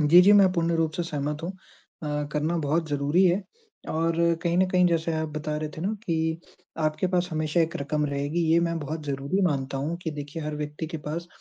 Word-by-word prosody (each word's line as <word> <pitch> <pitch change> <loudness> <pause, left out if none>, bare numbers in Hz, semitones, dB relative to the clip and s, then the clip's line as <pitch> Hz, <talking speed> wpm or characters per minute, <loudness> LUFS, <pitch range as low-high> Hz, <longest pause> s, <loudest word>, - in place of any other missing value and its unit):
जी, 155 +4 +7
जी, 200 +3 +7
मैं 195 -3 +6
पूर्ण 170 -2 +1
रूप 160 -1 +1
से 175 - -2
सहमत 150 -1 -3
हूँ। 170 - -2 0.5
अ, 150 -1 -1
करना 155 +3 0
बहुत 155 +2 0
ज़रूरी 145 +5 +2
है, 185 +2 +3 0.5
और 165 +1 +1 0.3
कहीं 170 0 +1
न 185 - +4
कहीं 180 -1 +4
जैसे 165 -1 +1
आप 160 0 -1
बता 150 0 -2
रहे 155 0 -3
थे - - -6
ना 185 - 0 0.2
कि 160 0 0 0.4
आपके 155 +3 +1
पास 180 -1 +1
हमेशा 155 +1 +1
एक 165 +2 +1
रकम 150 +1 -1
रहेगी। 145 +4 -1
ये 165 - +6
मैं 170 -1 0
बहुत 155 +2 -4
ज़रूरी 140 +7 -1
मानता 135 -5 0
हूँ 155 +5 -2
कि 160 - -2
देखिए, 150 +1 -6
हर 150 0 -3
व्यक्ति 150 +1 -4
के 160 +1 -5
पास 160 +4 -5
160 Hz, 220 wpm, -26 LUFS, 150-170 Hz, 0.5 s, जी